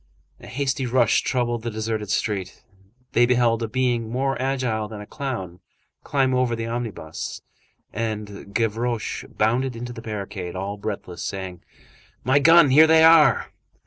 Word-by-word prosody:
A - - -13
hasty 135 0 -2
rush 120 -2 +3
troubled 120 -2 -1
the 115 - -3
deserted 110 -1 -3
street; 100 -4 -2 0.5
they 120 +1 +4
beheld 120 -2 +2
a 115 - -1
being 120 -1 0
more 135 +3 -1
agile 125 -5 -1
than 105 -1 -8
a 105 - -8
clown 100 - -5 0.4
climb 135 -2 +1
over 125 -2 +1
the 115 0 -4
omnibus, 115 -9 -5 0.5
and 105 -2 -5
Gavroche 115 +1 -2
bounded 120 +4 0
into 120 +1 -6
the 115 - -9
barricade, 100 -5 -6
all 100 +2 -4
breathless, 100 -4 -6
saying:— 95 -3 -5 0.6
"My 130 +3 +3
gun! 165 -1 +6
Here 155 +4 +7
they 160 0 +6
are!" 160 -3 +5
115 Hz, 145 wpm, -23 LUFS, 105-130 Hz, 0.6 s, Here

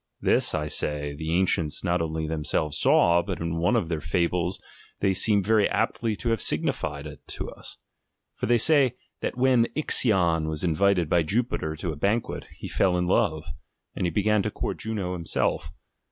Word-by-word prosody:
This, - - +2
I 75 -1 -1
say, 75 -1 -2
the 80 +2 -5
ancients 85 -5 0
not 90 -2 +1
only 80 -1 -2
themselves 75 -1 -1
saw, 85 0 +4
but 85 - -5
iu 85 0 -3
one 85 +1 +1
of 85 - +1
their 80 -2 -3
fables 85 +3 -1 0.4
they 95 -1 +2
seem 100 +1 +3
very 110 +1 +3
aptly 115 -2 -1
to 120 - -3
have 115 -4 0
signified 70 -2 -1
it 75 -1 -9
to - - -6
us. - - -10 0.6
For - - -4
they 120 +1 +4
say, 135 -1 +3 0.2
that - - -4
when 125 -2 +3
Ixion 90 - +2
was 80 +1 -2
invited 90 +1 +2
by 85 +2 +3
Jupiter 80 -3 -1
to 80 +2 -4
a - - -6
banquet, 105 +8 -1
he - - -7
fell 90 -2 +1
in 90 - 0
love, 90 -5 +1 0.5
and 90 - -1
began 105 +3 +2
to - - -2
court - - -4
Juno 100 -5 -3
herself. 85 -2 -1
90 Hz, 180 wpm, -26 LUFS, 80-105 Hz, 0.6 s, saw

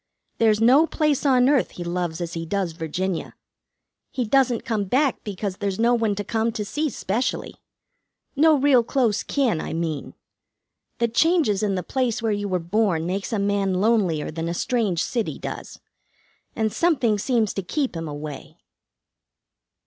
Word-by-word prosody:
There's 220 -2 +4
no 265 +8 +5
place 300 -3 +1
on 255 -2 +4
earth 280 -2 +3
he 175 - -4
loves 175 -1 -3
as 170 0 -4
he 165 - -4
does 185 +1 -2
Virginia. 165 +3 -3 0.7
He 250 - -2
doesn't 250 0 +2
come 220 -5 -1
back 265 +7 +1
because 200 -2 -4
there's 200 -2 -2
no 235 +2 +3
one 225 -3 +1
to 205 - -3
come 225 +2 0
to 210 - -3
see 300 +8 -1
specially. 225 +1 -2 0.8
No 310 +2 +5
real 270 -2 +5
close 235 -4 +1
kin, 245 - 0
I - - -5
mean. 160 -3 -3 0.8
The 235 - +2
changes 240 - +2
in 205 -2 0
the 180 - -2
place 250 +2 -1
where 225 -1 0
you 205 0 -1
were 185 -2 0
born 175 -1 0
make 195 +5 -3
a 220 - 0
man 200 -1 0
lonelier 190 -7 +1
than 165 +1 -3
a 170 - -3
strange 210 -6 0
city 235 -4 -2
does, - - -7 0.8
and 220 -2 0
something 260 -11 +2
seems 225 -2 +1
to 195 - -2
keep 260 - -2
him 165 -1 -4
away." 145 -1 -7
210 Hz, 165 wpm, -23 LUFS, 180-245 Hz, 0.8 s, no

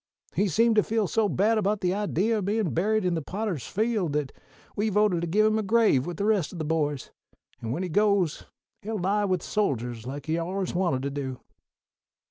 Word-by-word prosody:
He 205 - +1
seemed 225 +5 +3
to - - +7
feel 220 -1 0
so 220 0 +1
bad 215 +4 +2
about 205 0 0
the 180 0 +1
idee 205 +1 0
o' 215 - 0
bein' 205 -1 0
buried 215 +4 +1
in 180 - +1
the 165 - -1
Potter's 190 - -4
Field 210 -7 0
that 145 -2 -1 0.4
we 210 +2 0
voted 205 -4 +2
to 170 - -2
give 210 +6 +3
him 215 0 +2
a - - +1
grave 210 - +3
with 175 -2 -5
the 200 - -1
rest 210 -7 +1
of 180 - -8
the 160 - -3
boys, 150 -3 -1 0.5
and 115 - -4
when 165 +9 -2
he 180 - -3
goes 200 -3 +1 0.3
he'll 220 +2 -4
lie 205 +3 +1
with 185 -3 0
soldiers, 125 - -2
like 140 +2 -6
he's 160 +1 0
allers 185 +2 -3
wanted 175 -8 0
to 140 - -2
do." 135 -3 -4
190 Hz, 215 wpm, -26 LUFS, 160-215 Hz, 0.5 s, to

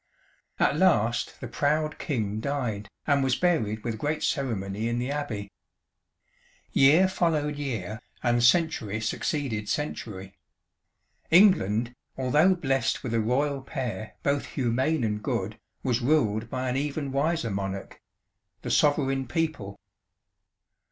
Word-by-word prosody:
"At - - +2
last - - +2
the - - -4
proud 150 +1 0
King 110 -7 -2
died 115 -6 -2 0.2
and 140 -2 +3
was 130 -2 +2
buried 110 -13 0
with 115 -2 -3
great 150 +3 -1
ceremony 110 -5 -1
in 120 - -1
the 125 +3 -2
Abbey. 110 -9 -4 1.2
Year 155 +8 +6
followed 155 -5 0
year, 110 -7 -4 0.2
and 120 -1 +2
century 120 - +2
succeeded 110 -1 -2
century. 100 -10 -4 1.0
England, 125 - +4 0.2
although 150 +8 +4
blessed 135 -6 0
with 120 -4 -3
a 115 - +2
Royal 135 +5 0
pair 125 -7 -5
both 140 0 0
humane 130 +3 0
and 105 -1 -1
good, - - -3 0.2
was 125 -1 +1
ruled 115 -5 +1
by 130 +1 -2
an 125 - -1
even 140 0 -2
wiser 140 -3 0
monarch 95 0 -5 0.6
the - - -3
Sovereign 135 -3 +2
People. 155 - -2
130 Hz, 125 wpm, -27 LUFS, 110-150 Hz, 1.2 s, Year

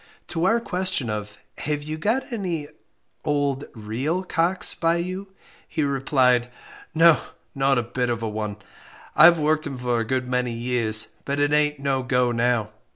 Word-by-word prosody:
To 165 +1 -1
our 225 +5 +4
question 185 - -2
of 105 -1 -5 0.2
"Have 150 0 -2
you 155 +1 -4
got 225 +11 -1
any 175 -9 -3 0.6
old 145 -2 0
real 125 - -2
'cocks' 180 +1 0
by 165 0 +1
you?" 185 +3 -4 0.4
he 155 - -1
replied, 130 -3 +2 0.5
"No, 165 0 +6 0.3
not 135 -1 +2
a 120 - +1
bit 125 +1 -2
of 115 -1 -2
a - - -1
one; 105 -1 -4 0.6
I've 170 0 +8
worked 155 0 +1
'em 135 -2 -5
for 125 -1 0
a - - 0
good 130 +2 -1
many 125 -1 0
years, 115 -2 0
but 140 +1 -2
it 145 +1 +2
ain't 150 0 +2
no 135 -1 0
go 125 -1 +1
now. 115 -2 +1
140 Hz, 165 wpm, -24 LUFS, 120-165 Hz, 0.6 s, I've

